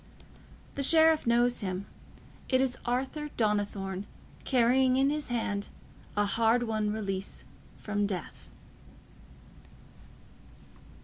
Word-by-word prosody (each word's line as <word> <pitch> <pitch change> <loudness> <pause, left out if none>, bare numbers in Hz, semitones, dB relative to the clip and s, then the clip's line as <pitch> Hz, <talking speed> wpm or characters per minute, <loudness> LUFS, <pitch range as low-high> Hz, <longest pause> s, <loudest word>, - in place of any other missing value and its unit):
The 280 - -3
Sheriff 320 0 +5
knows 240 +1 +3
him: 190 -1 -4 0.6
it 260 - +3
is 260 -1 0
Arthur 265 +5 -2
Donnithorne, 205 -3 -1 0.4
carrying 255 0 +3
in 275 +1 +3
his 300 0 -3
hand 210 -4 -2 0.5
a 205 - +3
hard 225 +3 +2
won 215 -2 -1
release 195 -3 -4 0.3
from 205 -1 -1
death. 185 -5 -6
230 Hz, 100 wpm, -29 LUFS, 205-260 Hz, 0.6 s, Sheriff